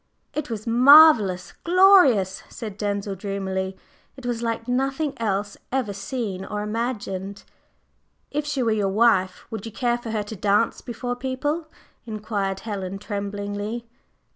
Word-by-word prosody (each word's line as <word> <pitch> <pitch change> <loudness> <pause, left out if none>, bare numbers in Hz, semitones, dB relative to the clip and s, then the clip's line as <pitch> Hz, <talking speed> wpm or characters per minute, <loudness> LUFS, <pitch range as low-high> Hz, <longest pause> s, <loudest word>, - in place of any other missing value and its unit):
"It 300 -3 -3
was 215 -2 -5
marvellous 240 - +7
glorious!" 340 - +5
said 215 -4 -7
Denzil 200 -1 -2
dreamily. 190 -1 -3 0.4
"It 265 - -11
was 240 -1 -2
like 230 0 -2
nothing 270 +4 0
else 205 -2 -2
ever 250 -6 -1
seen 195 -1 -4
or 210 +1 -4
imagined!" 210 -3 -4 0.9
"If 295 +1 -1
she 290 -3 -1
were 230 - +2
your 205 -2 +1
wife, 195 -3 +2
would 220 -3 -5
you 225 - -7
care 240 +2 0
for 240 - -7
her 220 -1 -1
to 210 +2 -8
dance 205 +3 +1
before 245 +1 -4
people?" 270 +6 -2 0.4
inquired 205 -3 -3
Helen 195 -3 -4
tremblingly. 205 +2 -4
215 Hz, 140 wpm, -24 LUFS, 200-245 Hz, 0.9 s, marvellous